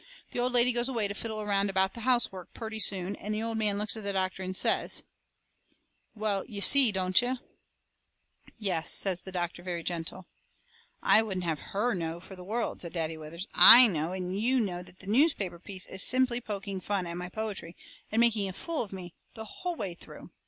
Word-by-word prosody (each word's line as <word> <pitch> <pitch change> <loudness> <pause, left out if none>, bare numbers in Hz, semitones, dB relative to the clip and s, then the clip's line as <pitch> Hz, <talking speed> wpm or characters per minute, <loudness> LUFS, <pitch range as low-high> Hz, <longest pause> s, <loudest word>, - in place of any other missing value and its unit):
The - - -4
old 250 +1 +1
lady 245 0 +4
goes 240 +2 0
away 230 -5 0
to 200 - -6
fiddle 220 0 -6
around 200 -1 0
about 190 0 +1
the - - -10
housework 235 -7 -1
purty 220 -1 -6
soon 195 -1 +1
and 210 +1 -4
the 215 - -2
old 230 0 -3
man 210 -2 +2
looks 210 +1 +1
at 220 - -7
the 200 - -1
doctor 190 0 -2
and 185 0 -3
says: - - +2 1.1
"Well, 210 -2 -1
you 205 - -7
see, 255 +2 +8
don't 185 0 +2
you?" 250 +1 -2 1.2
"Yes," 185 -7 -1
says 185 -3 +4
the 190 - -10
doctor, 175 -1 -4
very 175 -2 -5
gentle. 170 +1 -5 0.8
"I 220 - +5
wouldn't 190 -5 -4
have 160 -3 -2
HER 225 +5 -2
know 165 -2 -4
for 190 +2 -12
the 180 - -11
world," 225 +5 -3
says 170 - -5
Daddy 165 -2 -3
Withers. 160 +4 -8
"I 245 +2 +10
know 160 -2 -2
and 185 +1 -4
YOU 255 +3 +2
know 180 -6 -2
that 185 +1 -14
newspaper 210 - +1
piece 185 +1 -7
is 190 - -4
just - - +3
simply 255 -1 +1
poking 200 -3 -6
fun 195 -1 -2
at 170 0 -6
my 180 0 -6
poetry, 205 -5 -6 0.4
and 220 - 0
making 220 -4 +2
a - - -7
fool 330 - -4
of 215 - -6
me, 180 -3 -9 0.2
the 220 - -8
whole 355 +10 -6
way 195 - -5
through. 170 - -14
200 Hz, 210 wpm, -28 LUFS, 180-225 Hz, 1.2 s, I